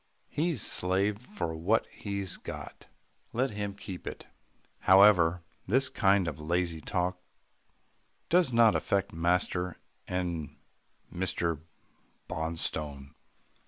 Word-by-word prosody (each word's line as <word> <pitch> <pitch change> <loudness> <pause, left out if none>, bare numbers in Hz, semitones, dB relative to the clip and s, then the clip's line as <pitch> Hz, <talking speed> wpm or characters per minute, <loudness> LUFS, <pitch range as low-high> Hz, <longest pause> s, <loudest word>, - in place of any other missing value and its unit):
He's 155 - 0
slaved 100 +4 +1
for 125 - -4
what 90 +8 +2
he 100 -1 -4 0.2
got. - - -8 0.5
Let 130 +3 +1
him 100 -1 -4
keep 95 -2 -8
it." - - -6 0.5
However, 90 -3 +6 0.2
this 130 +6 +3
kind 95 -2 +3
of 80 - -4
lazy 85 +1 -1
talk 90 +3 -1 1.1
does 175 -6 +4
not 115 -2 +5
affect 100 -1 0
master 90 +1 0 0.3
and 85 -5 -3 0.6
Mr. 85 -3 -1 0.7
Bonstone. 75 -3 -3
90 Hz, 100 wpm, -30 LUFS, 85-105 Hz, 1.1 s, However